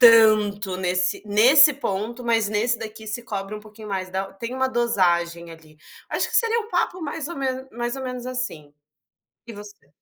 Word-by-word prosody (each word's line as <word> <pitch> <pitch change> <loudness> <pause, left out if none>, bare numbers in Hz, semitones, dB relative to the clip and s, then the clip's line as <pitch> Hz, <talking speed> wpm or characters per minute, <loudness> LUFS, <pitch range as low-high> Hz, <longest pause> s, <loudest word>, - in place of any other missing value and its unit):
tanto 210 -3 +3
nesse 185 0 0
nesse 260 +8 +7
ponto, 235 0 -3
mas 225 -3 +1
nesse 230 +3 0
daqui 220 0 -8
se 220 +3 -4
cobre 200 -3 -5
um - - -7
pouquinho 215 0 -12
mais 190 -2 -3
da 190 +1 -4
tem 230 +5 -6
uma 260 0 +1
dosagem 175 -8 0
ali. 160 -2 -16 0.3
Acho - - 0
que - - -4
seria 460 0 +3
um 435 -1 -8
papo 355 +1 0
mais 295 -1 -4
ou 345 - -7
me 275 - -3 0.3
mais 240 +1 -3
ou 270 - -6
menos 250 -1 -5
assim. 250 -13 -5 0.7
E 230 - -8
você? 205 -6 -12
215 Hz, 185 wpm, -23 LUFS, 195-250 Hz, 0.7 s, nesse